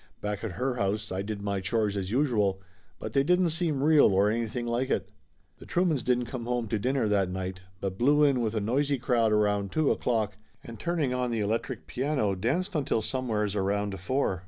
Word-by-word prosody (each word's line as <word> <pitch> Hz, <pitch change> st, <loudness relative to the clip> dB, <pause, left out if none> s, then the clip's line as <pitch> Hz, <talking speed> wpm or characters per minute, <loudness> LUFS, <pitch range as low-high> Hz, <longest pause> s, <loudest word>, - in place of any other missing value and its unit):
Back 105 Hz, 0 st, -4 dB
at 110 Hz, -5 st, -3 dB
her 125 Hz, +6 st, -2 dB
house 105 Hz, 0 st, -1 dB
I 95 Hz, +1 st, -2 dB
did 100 Hz, 0 st, -5 dB
my 100 Hz, -1 st, -1 dB
chores 105 Hz, +1 st, 0 dB
as 95 Hz, -2 st, -3 dB
usual, 110 Hz, -7 st, +1 dB, 0.4 s
but 110 Hz, -, -6 dB
they 135 Hz, -, +4 dB
didn't 180 Hz, +3 st, +3 dB
seem 160 Hz, -4 st, -1 dB
real 150 Hz, -10 st, +5 dB
or 100 Hz, +2 st, +4 dB
anything 115 Hz, +1 st, -2 dB
like 120 Hz, +3 st, -1 dB
it. -, -, -1 dB, 0.5 s
The -, -, -12 dB
Truemans 175 Hz, -6 st, +1 dB
didn't 125 Hz, 0 st, +1 dB
come 120 Hz, 0 st, -6 dB
home 120 Hz, -2 st, -1 dB
to 110 Hz, -, 0 dB
dinner 130 Hz, +1 st, +1 dB
that 100 Hz, -3 st, +2 dB
night, 95 Hz, 0 st, -4 dB, 0.2 s
but 95 Hz, -1 st, -3 dB
blew 145 Hz, +5 st, +4 dB
in 140 Hz, -4 st, +3 dB
with 115 Hz, -1 st, -1 dB
a 110 Hz, -, 0 dB
noisy 140 Hz, +6 st, +1 dB
crowd 120 Hz, -3 st, +2 dB
around 105 Hz, -2 st, +1 dB
two 155 Hz, -2 st, +2 dB
o'clock 110 Hz, -4 st, 0 dB, 0.3 s
and 115 Hz, -1 st, -10 dB
turning 165 Hz, -7 st, 0 dB
on 125 Hz, -1 st, -1 dB
the 115 Hz, -2 st, -1 dB
electric 110 Hz, +3 st, -2 dB
piano, 130 Hz, -6 st, 0 dB
danced 140 Hz, -, -1 dB
until 135 Hz, -8 st, 0 dB
somewheres 110 Hz, -5 st, -1 dB
around 100 Hz, 0 st, -1 dB
four. 95 Hz, -1 st, 0 dB
115 Hz, 205 wpm, -28 LUFS, 100-135 Hz, 0.5 s, real